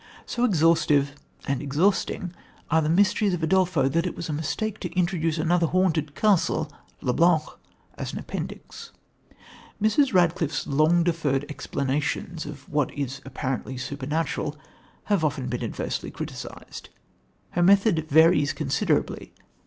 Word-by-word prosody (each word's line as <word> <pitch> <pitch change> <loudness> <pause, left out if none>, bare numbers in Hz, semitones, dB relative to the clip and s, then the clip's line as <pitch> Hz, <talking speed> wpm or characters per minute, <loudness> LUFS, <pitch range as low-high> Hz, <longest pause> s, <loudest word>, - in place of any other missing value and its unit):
So 240 0 0
exhaustive 160 - +3 0.3
and 140 -1 -1
exhausting 170 +4 0 0.4
are 160 +1 +4
the 155 - 0
mysteries 200 +2 +3
of 170 - -6
Udolpho 175 -4 +2
that 170 +5 +1
it - - -5
was 165 - -6
a - - -1
mistake 190 +8 -2
to 180 - -5
introduce 170 -3 0
another 170 +1 +2
haunted 160 -5 +1
castle, 165 -7 +2 0.3
le 125 - 0
Blanc, 170 0 +4 0.6
as - - -3
an - - -6
appendix. - - -7 0.9
Mrs. 220 +6 +3
Radcliffe's 170 -5 +1
long 155 +5 +3
deferred 150 -5 0
explanations 150 +4 -3
of 145 -2 -9
what 145 -2 0
is 140 -1 -4
apparently 130 -1 -4
supernatural 145 +3 -3 0.5
have 200 -6 +1
often 145 -4 -1
been - - -3
adversely - - -3
criticised. - - -8 0.6
Her 175 - 0
method 185 -4 +4
varies 150 -2 +5
considerably. - - -1
160 Hz, 130 wpm, -25 LUFS, 145-180 Hz, 0.9 s, varies